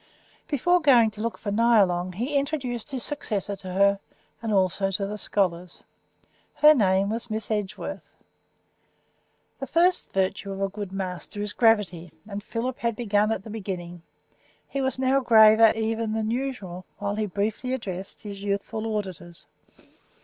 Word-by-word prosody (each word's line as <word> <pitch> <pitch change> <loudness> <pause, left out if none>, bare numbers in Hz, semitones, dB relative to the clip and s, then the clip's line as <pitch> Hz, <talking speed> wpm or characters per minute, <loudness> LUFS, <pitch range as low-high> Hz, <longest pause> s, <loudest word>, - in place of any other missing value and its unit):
Before 350 +5 +2
going 245 -7 +5
to 210 - -9
look 230 +1 -2
for 205 - -4
Nyalong 200 -5 +3
he 250 +8 -2
introduced 275 -5 -1
his 265 -3 -4
successor 210 -9 -3
to 185 -1 -8
her, 200 +1 +3 0.4
and 225 -1 -3
also 195 0 +2
to 195 +1 -1
the 210 +1 -5
scholars. 180 -4 -2 0.7
Her 305 0 +7
name 195 -5 +2
was 235 +1 +2
Miss 220 0 0
Edgeworth. 205 -3 -4 1.5
The 270 - -5
first 345 +6 +2
virtue 195 +1 -1
of 195 - -7
a 195 0 0
good 205 -1 -6
master 190 +1 -5
is 205 0 -2
gravity, 200 -7 +2 0.2
and 205 -1 -5
Philip 235 +4 -4
had 235 -1 -1
begun 210 -2 +1
at 210 -3 -2
the 220 - -9
beginning. 180 -5 -6 0.7
He 275 - -3
was 265 0 0
now 265 +1 +2
graver 220 -2 +7
even 225 0 -1
than 220 0 -1
usual 230 -9 -4
while 200 0 -2
he 215 0 -1
briefly 210 +6 -2
addressed 195 -6 -7
his 200 -2 -7
youthful 205 +2 -3
auditors. 175 -4 -6
210 Hz, 155 wpm, -25 LUFS, 195-235 Hz, 1.5 s, Her